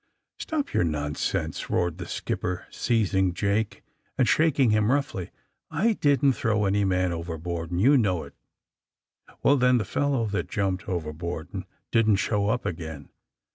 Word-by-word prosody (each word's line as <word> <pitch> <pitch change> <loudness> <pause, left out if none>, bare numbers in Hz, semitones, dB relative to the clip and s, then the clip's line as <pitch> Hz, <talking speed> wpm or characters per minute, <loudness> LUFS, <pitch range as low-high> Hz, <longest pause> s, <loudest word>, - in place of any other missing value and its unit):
^^Stop 300 -3 -3
your - - +3
nonsense!'' 75 -3 -2
roared 90 0 0
the 85 - -5
skipper, 90 0 -3
seizing 95 -6 +1
Jake, 100 +2 -1 0.3
and 130 -3 +3
shaking 145 -7 +3
him 110 +1 +3
roughly. 135 -10 -1 0.4
*'I 225 +2 +2
didn't 140 -1 +4
throw 105 -3 0
any 100 +1 +2
man 90 -2 +1
overboard, 85 0 -4
and 90 0 -2
you 135 +7 +5
know 95 -7 +1
it!" - - -12 1.1
^^Well, 140 0 +5
then, 125 0 +4
the 110 - -1
fellow 140 +1 0
that 105 -1 -2
jumped 95 -1 -1
over 80 -4 -2
board 85 0 -5
and - - -5 0.3
didn't 110 -2 +4
show 100 +1 0
up 125 +3 -1
again. 80 -4 -5
100 Hz, 155 wpm, -26 LUFS, 85-125 Hz, 1.1 s, you